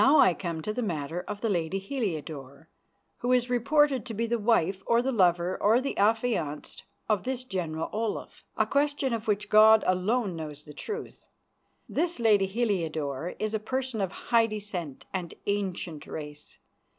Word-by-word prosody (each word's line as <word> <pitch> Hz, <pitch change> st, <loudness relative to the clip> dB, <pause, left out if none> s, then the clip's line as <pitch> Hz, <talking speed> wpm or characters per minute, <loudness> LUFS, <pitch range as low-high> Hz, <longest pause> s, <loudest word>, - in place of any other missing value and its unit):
"Now 285 Hz, +3 st, +6 dB
I 190 Hz, -10 st, +6 dB
come 165 Hz, -3 st, -4 dB
to 215 Hz, -, -2 dB
the 250 Hz, -, -2 dB
matter 170 Hz, -4 st, -2 dB
of 205 Hz, -, -5 dB
the 225 Hz, -, 0 dB
lady 175 Hz, 0 st, 0 dB
Heliodore, 160 Hz, -, -5 dB, 0.5 s
who 245 Hz, -, 0 dB
is 250 Hz, 0 st, +2 dB
reported 275 Hz, +1 st, +3 dB
to 225 Hz, -, -5 dB
be 230 Hz, +3 st, 0 dB
the 235 Hz, 0 st, 0 dB
wife 195 Hz, -4 st, +2 dB
or 235 Hz, -, +4 dB
the 265 Hz, -, 0 dB
lover 180 Hz, -4 st, +2 dB
or 220 Hz, +4 st, +5 dB
the 275 Hz, +2 st, -3 dB
affianced 205 Hz, -8 st, 0 dB, 0.2 s
of 210 Hz, -4 st, +1 dB
this 255 Hz, +1 st, -3 dB
General 170 Hz, -8 st, -3 dB
Olaf, 220 Hz, 0 st, -3 dB
a -, -, +3 dB
question 285 Hz, -2 st, +1 dB
of 225 Hz, 0 st, -3 dB
which 210 Hz, 0 st, 0 dB
God 215 Hz, +1 st, +7 dB
alone 190 Hz, +2 st, +1 dB
knows 150 Hz, -2 st, -7 dB
the 150 Hz, -, -12 dB
truth. 430 Hz, -, -7 dB, 0.6 s
This 345 Hz, -2 st, -1 dB
lady 210 Hz, -4 st, +4 dB
Heliodore 170 Hz, -, -1 dB
is 215 Hz, 0 st, -2 dB
a 220 Hz, -, +1 dB
person 255 Hz, 0 st, -2 dB
of 190 Hz, -2 st, -1 dB
high 230 Hz, +3 st, +2 dB
descent 200 Hz, -9 st, -5 dB
and 180 Hz, -3 st, -4 dB
ancient 185 Hz, -6 st, -2 dB
race. 150 Hz, -1 st, -8 dB
205 Hz, 170 wpm, -28 LUFS, 170-235 Hz, 0.6 s, God